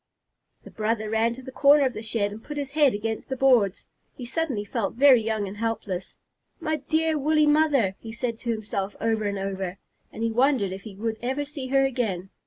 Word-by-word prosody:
The - - -12
brother 215 0 -1
ran 225 +1 +1
to 260 - -11
the 260 - -8
corner 280 +2 +5
of 255 - 0
the - - -6
shed 215 -2 -1
and 215 +2 -9
put 295 - -7
his 280 -2 -3
head 290 -5 +3
against 220 +4 -4
the 265 - -1
boards. 245 -7 +3 0.3
He 250 - -6
suddenly 255 -5 -2
felt 205 0 -2
very 260 -2 +6
young 220 -2 -1
and 195 +2 -8
helpless. 210 -5 -3 0.4
"My 315 -2 -1
dear 315 +2 0
woolly 305 +2 +3
mother!" 295 -10 +3
he 225 - -8
said 230 0 -3
to 240 - -6
himself, 210 -3 -3
over 220 -1 0
and 200 0 -1
over, 195 -1 -4 0.3
and 225 - -5
he 230 - +1
wondered 245 -4 +2
if 190 +1 -6
he 200 -1 -10
would 220 +2 -3
ever 265 +4 -2
see 280 -2 -6
her 270 +1 +3
again. 210 -8 -2
230 Hz, 210 wpm, -25 LUFS, 210-270 Hz, 0.4 s, very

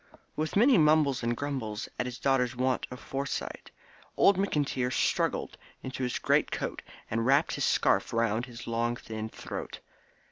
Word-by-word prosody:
With 155 +1 -2
many 235 +1 +6
mumbles 150 -4 +4
and 120 0 -1
grumbles 130 -7 -3
at 120 - 0
his 125 0 -6
daughter's 130 -2 +1
want 130 0 0
of 125 - -8
foresight, 135 +1 -4 0.5
old 200 - +6
McIntyre 145 -9 0
struggled - - 0 0.2
into 130 0 -5
his 125 -1 -1
great - - +2
coat - - -3 0.3
and 115 +1 0
wrapped 140 +6 +3
his - - 0
scarf - - +2
round 115 +1 0
his 120 -1 -9
long 115 +1 0
thin 110 -2 -6
throat. - - -7
125 Hz, 155 wpm, -29 LUFS, 115-145 Hz, 0.5 s, many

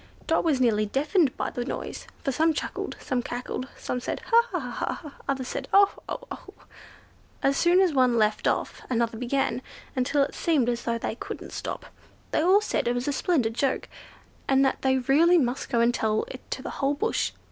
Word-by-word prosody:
Dot 325 - +2
was 300 -6 +2
nearly 215 -4 +2
deafened 295 - +2
with - - -2
the 245 - -2
noise; - - -5 0.2
for 275 - 0
some 315 +4 +2
chuckled, - - -4
some 255 -3 -1
cackled; 245 +1 -4
some 250 - -3
said, - - -3
"Ha! 465 0 +5
ha! - - -1
ha!" 300 -3 -4 0.2
others 265 -2 -1
said, - - -4
"Oh! 400 0 +6 0.2
oh! - - -4
oh!" - - -9 0.9
and 275 - +4
as 275 - -2
soon 350 +2 +4
as 370 -4 +3
one 255 -3 +3
left 215 -1 +2
off, - - -1
another 235 -2 0
began, 255 0 0 0.3
until 265 +2 +2
it 275 - -3
seemed 295 -8 +1
as 240 -1 -2
though 235 -1 0
they 230 - -3
couldn't 230 - -7
stop. - - -5 0.5
They - - +2
all 375 +5 +5
said 425 - -1
it 240 - +1
was 245 +2 -2
a 290 - +1
splendid 265 -8 +1
joke, 265 +3 0 0.6
and 270 0 +4
that 265 - 0
they 265 0 +3
really 295 +8 +4
must 255 -3 0
go 235 -3 +2
and 235 +1 +3
tell 220 -2 +1
it 255 - -9
to 260 - -4
the - - -5
whole 280 +1 +2
bush. 445 +10 0
265 Hz, 205 wpm, -26 LUFS, 245-310 Hz, 0.9 s, Oh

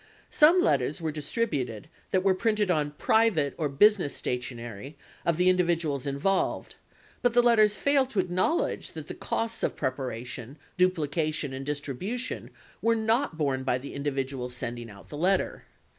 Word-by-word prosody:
Some 330 +5 +6
letters - - +1
were 160 -2 -2
distributed 145 - -2 0.2
that 185 -1 +1
were 195 -1 +4
printed 210 -1 +1
on 150 -3 +1
private 205 -11 +2
or 155 -3 -1
business 180 +1 +4
stationery 125 +1 -5 0.3
of 170 -2 +2
the 180 +1 +3
individuals 170 -6 +1
involved, 140 +8 -1 0.4
but 245 -1 +2
the 245 - +6
letters 215 -3 +5
failed 275 +3 +2
to 215 - -1
acknowledge 185 - 0
that - - -8
the - - -5
costs 230 0 -3
of - - -1
preparation, 130 0 -4 0.2
duplication, 155 -5 0
and 135 +1 -5
distribution 150 - -4 0.3
were 230 0 +3
not 225 - +1
borne 140 -4 0
by 130 -1 0
the 135 +2 -8
individuals 135 -3 -3
sending 120 -1 -5
out 100 -1 -14
the 145 - -7
letter. 185 +4 0
155 Hz, 150 wpm, -28 LUFS, 135-210 Hz, 0.4 s, Some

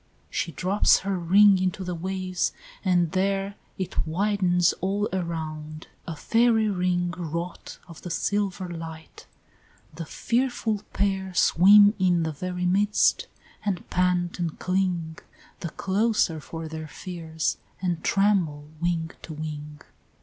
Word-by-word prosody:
She 165 - -2
drops 185 +8 +3
her 195 0 -1
ring 195 +3 +6
into 185 +1 -1
the 180 -1 -3
waves, 185 +1 -2 0.3
and 175 -4 +2
there 195 +1 0 0.2
It 185 -3 -2
widens 180 0 +2
all 200 +3 0
around, 155 -3 -4 0.2
a 165 - -4
fairy 225 +4 +3
ring 180 -2 0
Wrought 170 +1 -5
of 170 -2 -12
the 180 - -7
silver 195 +1 -1
light 165 -2 -9 0.7
the 165 0 -7
fearful 235 - -1
pair 190 -2 -1
Swim 205 +5 +7
in 175 -2 +3
the 160 - -1
very 180 +4 -4
midst, 200 +3 +2 0.4
and 195 -4 -2
pant 180 -1 +1
and 170 -3 -2
cling 180 -4 -1 0.4
The 170 - -4
closer 195 -3 +1
for 160 +2 -7
their 160 0 -6
fears, 160 -1 -4 0.2
and 175 -3 -2
tremble 175 -8 +1
wing 170 -2 0
to 160 - -8
wing. 150 -1 -7
180 Hz, 130 wpm, -26 LUFS, 165-195 Hz, 0.7 s, Swim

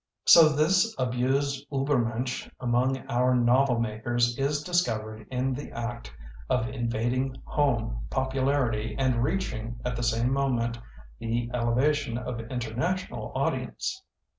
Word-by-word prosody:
So 165 -2 +9
this 185 +9 +2
abused 135 +3 0
Uehennensch 125 -3 -1
among 125 +1 0
our 125 +1 +2
novel 125 +1 +3
makers 120 +2 0
is 145 +3 0
discovered 110 -12 -1
in 130 +1 -1
the 140 +3 -6
act 115 - -5 0.4
of 115 - +1
invading 125 +1 -1
home 115 - 0
popularity 130 -4 0
and 130 -3 +1
reaching, 120 -9 -2
at 125 -1 -1
the 120 - -3
same 120 +2 +1
moment, 120 -4 0 0.4
the 115 +1 -2
ele 120 -1 +1
vation 145 -2 +1
of 125 -1 -4
international 125 +10 -3
audience. 375 +1 -2
125 Hz, 120 wpm, -27 LUFS, 115-135 Hz, 0.4 s, So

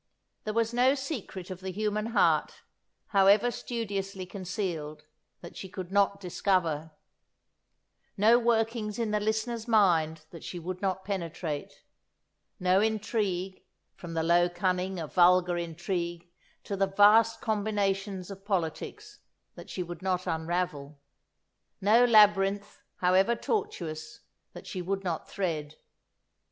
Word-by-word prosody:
There 215 - -2
was 230 0 +1
no 255 +3 +4
secret 245 - -6
of 185 - -6
the 190 0 -6
human 210 +2 -1
heart, 230 - +1 0.5
however 200 +4 +5
studiously 200 -6 -4
concealed, 180 -6 -5 0.4
that 170 - -11
she 190 - -7
could 185 -1 -7
not 200 0 +2
discover; 175 -4 0 1.3
no 225 +4 +5
workings 225 -2 0
in 230 -3 -1
the 210 - +1
listener's 220 +2 -2
mind 165 -8 +3
that 170 - -11
she 180 - -6
would 180 +2 -6
not 190 -1 -2
penetrate; 170 -6 -4 0.8
no 185 +2 +3
intrigue, 205 -4 -1 0.3
from 165 -2 -9
the 160 - 0
low 175 +1 +4
cunning 180 +1 -1
of 160 -3 -6
vulgar 180 0 +5
intrigue 170 +1 -4 0.4
to 200 - -4
the 195 0 +1
vast 210 +3 +5
combinations 200 -3 -1
of 195 0 -10
politics, 205 - -3 0.3
that - - -12
she 180 - -3
would 175 0 -8
not 185 -1 -1
unravel; 160 -3 -3 0.8
no 215 +5 +5
labyrinth, 205 -3 +4 0.2
however 190 +5 +4
tortuous, 235 - -4 0.3
that - - -10
she 185 - -5
would 195 +2 -2
not 170 -4 -3
thread. 155 -6 -3
195 Hz, 125 wpm, -29 LUFS, 175-215 Hz, 1.3 s, however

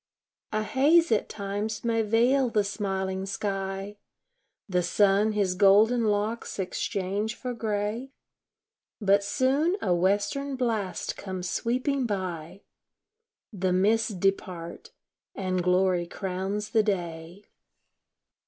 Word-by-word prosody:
A 215 0 0
haze 295 +10 +4
at 220 - +1
times 205 +1 -4
may 230 -1 +1
veil 240 +5 +3
the 215 -2 +2
smiling 190 -2 -3
sky, 195 0 -3 0.7
The 180 -3 +1
sun 200 +4 +3
his 200 -3 +1
golden 210 +5 +5
locks 210 +2 -1
exchange 200 +3 -2
for 250 -1 -5
gray; 220 +2 -2 0.9
But 200 -1 +3
soon 275 - +1
a 180 - +1
western 205 +10 0
blast 220 -8 -2
comes 185 -2 -5
sweeping 255 +2 0
by 185 -2 -4 0.9
The 185 -2 0
mists 215 +5 +2
depart, 180 -2 -2 0.5
and 185 -2 -1
glory 180 -1 +2
crowns 195 +3 -4
the 225 - +4
day. 175 -2 -4
205 Hz, 105 wpm, -27 LUFS, 190-225 Hz, 0.9 s, golden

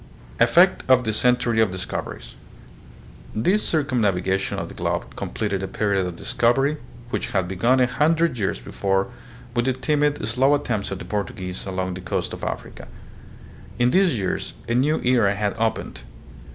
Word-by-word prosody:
Effect 170 +11 +5
of 130 -1 +5
the 110 -2 -1
Century 120 -1 +2
of 110 - +3
Discoveries. 90 -9 -5 1.0
This 185 - +2
circumnav 125 - +1
igation 95 +1 -1
of - - -3
the - - -10
globe - - -3
completed 100 -3 -3
a 95 - -3
period 100 0 0
of 90 - -6
discovery, 135 - +1 0.3
which - - -3
had 95 -2 +1
begun 115 +8 +2
a 125 - +5
hundred 160 +3 +2
years 95 - -1
before 95 +2 -1 0.4
with 120 0 +1
the 130 - +2
timid, 145 -1 0
slow 130 +5 +3
attempts 115 -8 -2
of 95 - -4
the - - -8
Portuguese 95 -3 -4
along 95 -1 -2
the 90 - -7
coast 90 - -3
of - - -8
Africa. - - -5 0.9
In 120 +1 +3
these 185 -8 +3
years 95 -3 -3
a 115 - 0
new 140 +6 +2
era 115 -6 +3
had 105 0 -1
opened. 115 0 -2
115 Hz, 165 wpm, -23 LUFS, 95-130 Hz, 1.0 s, Effect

